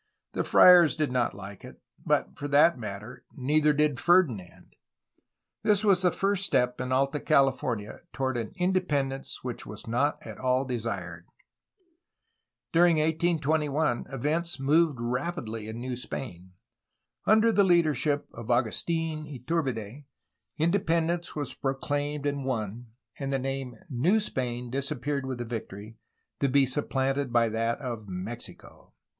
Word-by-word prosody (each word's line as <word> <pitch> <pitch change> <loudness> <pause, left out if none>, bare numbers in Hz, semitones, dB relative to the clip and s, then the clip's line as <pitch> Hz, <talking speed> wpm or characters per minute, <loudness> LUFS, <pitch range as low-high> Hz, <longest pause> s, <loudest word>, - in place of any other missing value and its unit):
The - - -1
friars 175 -3 +7
did 155 -4 -1
not 125 -5 0
like 100 0 -10
it, - - -12 0.2
but, - - 0
for 145 - -5
that 145 +4 +5
matter, 110 +3 -7
neither 150 +3 +3
did 150 -2 +1
Ferdinand. 145 - +1 0.9
This 210 0 +2
was 195 -3 +4
the 180 -1 +3
first 195 +1 0
step 125 -8 +1
in 130 0 -3
Alta 135 +3 +1
California 130 -7 +1
toward 130 -1 -2
an 115 -2 -3
independence 150 -8 -1
which 125 -2 -5
was 105 - -9
not 120 +6 +1
at - - -9
all 130 +1 +1
desired. 120 -3 -4 1.5
During 170 0 +5
1821 155 -3 +1
events 155 +5 -2
moved 150 +1 +3
rapidly 120 -3 -3
in 110 +1 -6
New 125 +1 -4
Spain. 95 -7 -7 0.7
Under 220 +2 +5
the 205 -2 +4
leadership 155 -5 +2
of 115 -1 -9
Agustfn 155 +6 -1
Iturbide, 130 -2 -3 0.5
independence 170 0 +1
was 145 -4 -4
pro 135 -1 -2
claimed 145 +1 -2
and 140 -1 -1
won, 115 -2 -3 0.3
and 140 -1 -3
the 135 - +1
name 135 -1 -4 0.2
^^New 170 - +3
Spain" 125 - -3
disappeared 140 +1 -2
with 130 -2 -3
the 120 - -4
victory, 110 -1 -7 0.4
to 140 - +2
be 140 +1 +4
supplanted 135 0 -1
by 115 -1 +3
that 115 +1 -1
of 120 -6 -5
"Mexico." 100 +6 -8
135 Hz, 135 wpm, -28 LUFS, 120-155 Hz, 1.5 s, friars